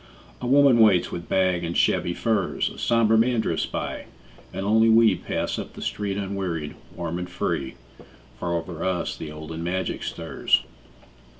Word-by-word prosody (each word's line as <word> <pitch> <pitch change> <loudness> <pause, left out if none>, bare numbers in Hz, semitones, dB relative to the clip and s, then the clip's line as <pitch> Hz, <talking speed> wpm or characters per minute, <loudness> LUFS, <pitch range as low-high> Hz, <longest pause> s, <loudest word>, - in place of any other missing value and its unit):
A 125 - -3
woman 135 -2 +5
waits 100 -6 +5
with 85 -1 -6
bag 95 -2 +2
and 85 0 -2
shabby 85 - +2
furs, 110 -6 0
A - - -11
somber 115 -2 +3
man 120 +1 +3
drifts - - -1
by, - - -4 0.5
and 95 - -4
only 110 +2 +4
we 110 -2 +6
Pass - - -3
up - - -7
the - - -10
street 100 -1 -2
unwearied, 95 -6 -3 0.2
warm 85 0 -3
and 90 0 -5
free, 70 -6 -2 0.6
For 85 - -2
over 85 0 -4
us 95 -1 -1
the 75 - -7
olden 80 +2 -7
magic 95 +2 -2
stirs. - - 0
95 Hz, 165 wpm, -24 LUFS, 85-110 Hz, 0.6 s, we